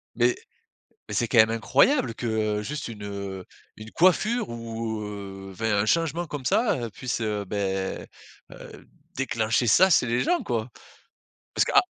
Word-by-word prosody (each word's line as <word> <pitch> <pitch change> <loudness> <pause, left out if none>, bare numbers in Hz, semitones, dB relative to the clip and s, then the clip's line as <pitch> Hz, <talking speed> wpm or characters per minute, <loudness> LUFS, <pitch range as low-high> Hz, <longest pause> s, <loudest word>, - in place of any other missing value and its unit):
Mais 120 +1 +3 0.7
mais - - -5
c'est 120 - 0
quand - - -1
même 110 0 +7
incroyable 115 - +2
que, 110 -3 -1
juste 145 +5 -5
une, 110 -3 -9
heu, 100 -2 -6 0.3
une 110 +1 -10
coiffure 215 - +2
ou 115 -1 -4
heu 100 -2 -7
enfin 110 +3 -1
un 100 - +2
changement 165 +5 +1
comme 145 -3 -6
ça, 220 +1 +2
heu, 115 - -8
puisse, 120 +3 -4
heu 105 -2 -2
beh, 95 -1 -3 0.4
heu, - - -12 0.3
déclencher 115 -3 0
ça 185 - +6
c'est 125 - +4
les 120 +2 +1
gens 355 -1 +1
quoi! 120 -1 -2 0.8
Parce - - +3
que - - -2
à - - +8
115 Hz, 165 wpm, -25 LUFS, 105-130 Hz, 0.8 s, à